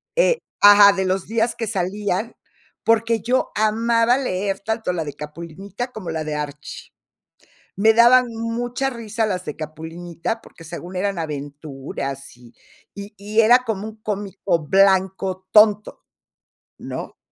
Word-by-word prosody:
eh - - +3 0.2
Ajá, 205 0 +9
de 190 -1 -1
los 185 0 -1
días 230 +1 0
que 225 - -4
salían, 200 +2 -2 0.5
porque 230 -1 +2
yo 255 +2 0
amaba 230 +3 +2
leer 195 -6 -2
tanto 220 -3 -2
la 165 -2 -2
de 145 - -6
Capulinita 170 - -7
como 190 -8 -7
la 160 -1 -3
de 155 0 -4
Archie. 150 0 -7 0.9
Me 220 +2 +5
daban 245 +2 +6
mucha 240 +3 -2
risa 225 -2 -3
las 185 -3 -3
de 150 - -5
Capulinita 165 +6 -6
porque 165 - -15
según 175 +3 -7
eran 200 -1 -1
aventuras, 140 -3 -6
y 120 -1 -17 0.4
y 200 +1 -9
y 210 +2 -2
era 240 +3 +6
como 215 -1 -3
un 220 0 -10
cómico 200 -4 -2
blanco 190 0 +2
tonto, 210 -1 +4 0.8
¿no?, - - -7
200 Hz, 140 wpm, -21 LUFS, 170-225 Hz, 0.9 s, Ajá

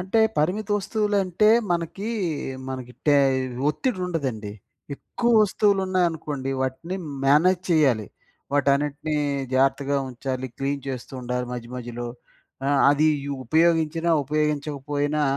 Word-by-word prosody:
అంటే 190 +5 +1 0.2
పరిమిత 185 +8 0
వస్తువులంటే 205 -1 +1 0.2
మనకి, 175 +5 -3 0.6
మనకి 130 -2 -6
టే 145 -1 +6 0.5
ఒత్తిడి 230 - -2
ఉండదండి. 130 -12 -3 0.4
ఎక్కువ 240 +10 -2
వస్తువులున్నాయనుకోండి, 185 -9 0
వాటిని 150 +8 -3 0.3
మేనేజ్ 170 +6 +4
చెయ్యాలి. 135 -10 +3 0.5
వాటన్నిటిని 145 +2 +1 0.4
జాగ్రత్తగా 135 +1 +2
ఉంచాలి. 130 +1 -4
క్లీన్ 140 0 -2
చేస్తూ 130 0 -6
ఉండాలి. 125 0 -3
మధ్య, 120 -1 -6
మధ్యలో 120 0 -5 0.6
ఆ! - - +2 0.2
అది 150 +2 +3 0.2
యు 140 - -3
ఉపయోగించినా, 165 +3 +2
ఉపయోగించకపోయినా 150 0 -1
150 Hz, 100 wpm, -24 LUFS, 135-175 Hz, 0.6 s, టే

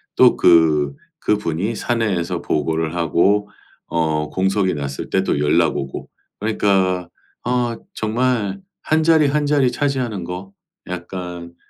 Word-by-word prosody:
또 - - +6
그 80 -4 +4 0.2
그분이 105 0 -1
사내에서 95 -8 -1
보고를 80 +2 -1
하고 95 +5 +2 0.4
어 80 -2 0
공석이 95 0 +1
났을 70 -2 -5
때 - - +1
또 - - 0
연락 75 0 +2
오고. 70 -1 -5 0.3
그러니까 95 -4 +1 0.3
아 120 -1 0 0.2
정말 110 -3 0 0.2
1 155 +1 +2
자리 160 -1 +4
1 145 +1 +1
자리 140 -4 +3
차지하는 130 -9 -1
거 90 +3 -7 0.3
약간 90 -1 -6
95 Hz, 225 characters per minute, -20 LUFS, 85-115 Hz, 0.4 s, 또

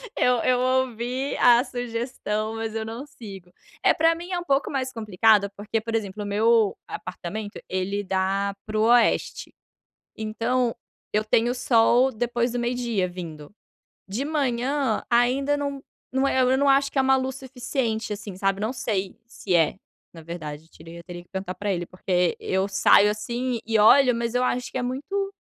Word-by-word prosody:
Eu 250 - +3
eu 250 -1 +3
ouvi 255 +1 -1
a 240 0 +6
sugestão, 230 -3 -3
mas 225 -1 -4
eu 220 0 -2
não 230 +5 -6
sigo. 195 -10 -11 0.3
Eh, - - +5
para 325 +1 +4
mim 345 +2 -8
é 360 - 0
um - - -6
pouco 280 -4 +1
mais 260 -2 -3
complicado 215 -2 +3
porque, 215 +2 -2
por 225 +1 -4
exemplo, 210 -2 -3
o - - -6
meu 215 +1 +2
apartamento 205 +4 -6
ele 195 +2 -2
dá 195 +1 0
para 215 0 -4
o 215 - +3
Oeste. 235 0 +2 0.6
Então, 230 +3 -1 0.4
eu 210 - +1
tenho 230 +3 +2
sol 245 +1 +4
depois 240 +1 -1
do 245 - -2
meio-dia 240 -5 -1
vindo. 165 -5 -8 0.6
De 210 +8 -3
manhã 275 -4 0
ainda 255 +4 +2
não 280 -1 -3 0.3
não 265 +1 +1
é 260 - +1
eu 255 0 +4
não 280 +1 +3
acho 275 0 +3
que 275 - 0
é - - +6
uma 265 0 +4
luz 260 0 -3
suficiente, 245 -4 -3
assim, 205 -2 -8
sabe 195 +1 0
não 215 +3 -1
sei 200 -7 -3
se 205 -5 -2
é, 165 +1 +2 0.4
na 165 - -11
verdade. 160 -2 -8 0.2
Eu 170 +1 -10
teria 175 0 -9
que 175 - -35
perguntar 190 -1 -5
para 205 +2 -2
ele, 175 -1 -4
porque 180 -1 0
eu 190 +1 0
saio 200 +1 +5
assim 235 +3 -2
e 225 -1 +1
olho 250 +4 +6
mas 235 0 -2
eu 250 - +2
acho 250 0 -1
que - - -3
é 250 - -2
muito 390 +11 -3
230 Hz, 180 wpm, -24 LUFS, 200-255 Hz, 0.6 s, a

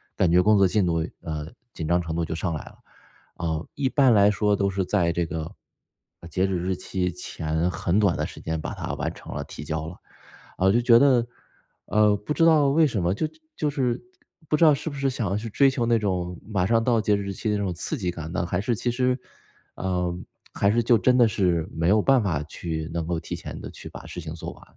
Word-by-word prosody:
感 90 - +2
觉 90 +1 +6
工 105 +1 +5
作 100 -1 +5
进 100 +1 +1
度， 85 -2 +1 0.2
呃， 75 -2 -5 0.3
紧 80 - -4
张 85 +2 +3
程 80 -2 -4
度 85 - 0
就 80 - -3
上 85 +1 -2
来 75 - -4
了。 - - -14 0.6
呃， 80 -1 -3
一 135 -2 0
般 135 -3 +4
来 100 -1 +6
说 105 0 +2
都 100 0 +1
是 95 -1 -1
在 90 -3 +1
这 85 0 -1
个 80 -1 -5 0.7
截 90 +4 +1
止 95 -1 -1
日 90 +2 -1
期 90 0 -2
前 80 -1 -2
很 90 +3 0
短 100 -5 +3
的 - - -2
时 - - -11
间 80 0 -3
把 - - -5
它 - - -4
完 - - -2
成 - - -10
了 - - -3
提 - - -9
交 80 +1 -3
了， 85 - -7 0.6
啊， 95 - +1
我 95 - +6
就 120 +4 +3
觉 120 -1 +6
得， 125 -2 +4 0.6
呃， 105 0 +3
不 105 +9 -4
知 165 - +2
道 155 -4 +5
为 155 +3 +4
什 115 -8 -2
么？ 85 +2 +2
就 155 +10 -1 0.3
就 150 - 0
是 130 -2 -1 0.5
不 150 - +3
知 165 - +5
道 155 - +7
是 145 +3 -3
不 145 - -8
是 135 -1 0
想 115 -6 -2
要 100 - 0
去 110 +2 -5
追 135 +6 +4
求 130 -3 -1
那 115 -1 +3
种 90 -4 -2
马 100 -4 -1
上 115 +3 +2
到 115 -1 +2
截 105 -1 +2
止 100 - -2
日 100 0 -4
期 110 - -3
那 105 - +1
种 100 -2 -1
刺 90 - -2
激 95 -7 -2
感 85 -2 -6
呢， 85 - -1
还 90 - -1
是 115 +4 0
其 120 - -2
实 125 +1 +1 0.6
呃， 90 -2 -2 0.4
还 100 - +2
是 120 +2 +2
就 120 0 +4
真 125 +3 +3
的 120 -2 +6
是 90 -6 0
没 80 +1 -1
有 105 +3 +4
办 135 0 +4
法 85 -8 0
去 80 +1 -5
能 85 -1 -2
够 85 0 -1
提 - - -6
前 - - -8
地 - - -7
去 - - -10
把 - - -10
事 - - -7
情 80 -2 -6
做 85 - -6
完。 - - -17
100 Hz, 270 characters per minute, -25 LUFS, 85-120 Hz, 0.7 s, 道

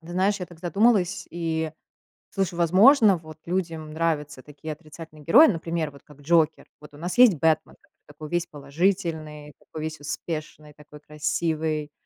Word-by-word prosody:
ты 165 - -16
знаешь, 195 +3 +1
я 180 - -4
так 175 -2 -16
задумалась 195 +1 +1
и 160 -2 -3 0.6
слышу, 195 -3 -2
возможно, 195 - +5
вот 155 -1 -12
людям 165 -3 -3
нравятся 155 -4 -2
такие 150 +1 -8
отрицательные 155 0 -13
герои, 260 - +7
например, 165 -4 -2
вот 140 - -16
как 145 -1 -18
Джокер. 160 +1 +2 0.2
Вот 150 -1 -14
у - - -13
нас 175 +7 -5
есть 250 -5 +8
Бэтмен, 160 +1 0
так - - -31 0.2
такой 150 +1 -10
весь 175 +1 -1
положительный, 155 0 -2
такой 155 - -9
весь 155 0 -5
успешный, 150 0 -6
такой 150 0 -15
красивый, 155 0 -2
160 Hz, 160 wpm, -25 LUFS, 150-175 Hz, 0.6 s, есть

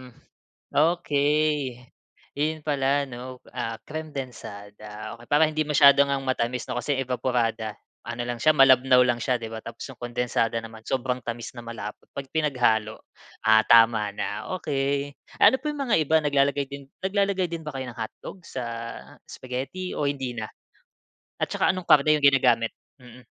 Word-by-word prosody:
Mm. 125 -2 -14 0.6
Okey. 155 -2 +2 0.9
Iyon 155 +1 -1
pala 140 -1 +1
ano, 125 -1 -8
ah, 115 -2 -5
kremdensada. 110 -7 -8
Okay, 120 - -15
para 145 +2 +3
hindi 155 -1 -1
masyado 140 -1 +6
ngang 140 -1 -1
matamis 125 -1 -1
'no, 120 - -1
kasi 140 +4 -1
'yung 135 - -1
evaporada 115 -4 -1 0.3
ano 120 +1 -5
lang 120 -1 -3
siya, 155 - +6
malabnaw 130 -3 +6
lang 120 -1 0
siya, 125 -2 +1
di 115 - -6
ba? 110 0 -7
Tapos 115 0 -8
yung 135 - -10
kondensada 120 -1 -1
naman 115 -1 -9
sobrang 130 +1 -2
tamis 120 +1 -6
na 120 - -8
malapot, 110 -3 -8
'pag 140 -1 -6
pinaghalo, 120 -8 +1 0.5
ah, 110 0 +6
tama 115 -2 +5
na, 105 +1 -4
okey. 140 -1 -1 0.2
Ano - - +7
pa 300 - -1
yung 295 -1 -4
mga 240 -5 +2
iba 155 0 +1
naglalagay 140 -1 +2
din 140 -1 -8 0.2
naglalagay 195 -1 +1
din 165 -1 -5
ba - - -3
kayo 130 -1 -4
ng 120 - -14
hotdogs 170 - -8
sa 125 - -2 0.6
spaghetti 135 +9 -5
o 145 - 0
hindi 135 -3 -2
na? 110 -2 -4 1.0
At - - 0
tsaka - - +2
anong 185 -2 -6
karne 150 +1 +5
yung 140 - +4
ginagamit? 125 -4 +4 0.3
Mm. 125 0 -15
130 Hz, 165 wpm, -25 LUFS, 115-145 Hz, 1.0 s, Ano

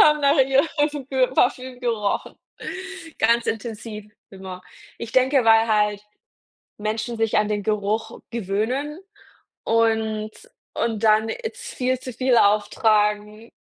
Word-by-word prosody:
haben 300 0 +5
nach 280 +1 +4
ihrem 290 +1 +2
Pö 260 -2 +2
Parfüm 255 0 +1
gerochen, 225 -4 -1 0.8
ganz 235 +1 +3
intensiv 215 -2 -5 0.2
immer. 190 -1 -9 0.4
Ich 230 -1 -7
denke, 260 0 +3
weil 225 0 +5
halt 210 -1 +1 0.8
Menschen 220 +2 -3
sich 225 -1 0
an 210 - +2
den 205 -1 -1
Geruch 210 +1 -2
gewöhnen 235 - -2 0.7
und 220 -1 +1 0.4
und 225 -2 -2
dann 215 0 +4
jetzt 455 - -6
viel 255 0 0
zu 255 -1 -7
viel 255 +1 +2
auftragen, 210 +1 +2
225 Hz, 120 wpm, -23 LUFS, 210-255 Hz, 0.8 s, haben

